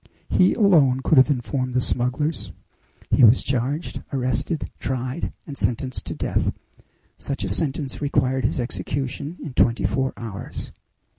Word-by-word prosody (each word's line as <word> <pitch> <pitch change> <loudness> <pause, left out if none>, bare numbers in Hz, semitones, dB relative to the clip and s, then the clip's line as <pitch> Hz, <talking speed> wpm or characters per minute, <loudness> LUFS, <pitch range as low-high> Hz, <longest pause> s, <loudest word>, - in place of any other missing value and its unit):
He 185 - +4
alone 155 - +4
could 150 - +5
have 130 - +6
informed 130 -1 -1
the - - +4
smugglers. 130 +6 -1 0.6
He - - +5
was 115 +2 +7
charged, 135 +5 -2
arrested, 130 +4 -1
tried, 130 +3 -3
and 145 - -7
sentenced 130 0 -2
to - - -3
death. - - 0 0.7
Such 140 -6 -3
a 95 - -2
sentence 135 - -1
required 130 -2 +1
his - - 0
execution 135 +5 -3
in 150 - -6
twenty 120 -1 +2
four 135 0 0
hours." 110 -4 -6
130 Hz, 140 wpm, -23 LUFS, 125-145 Hz, 0.7 s, was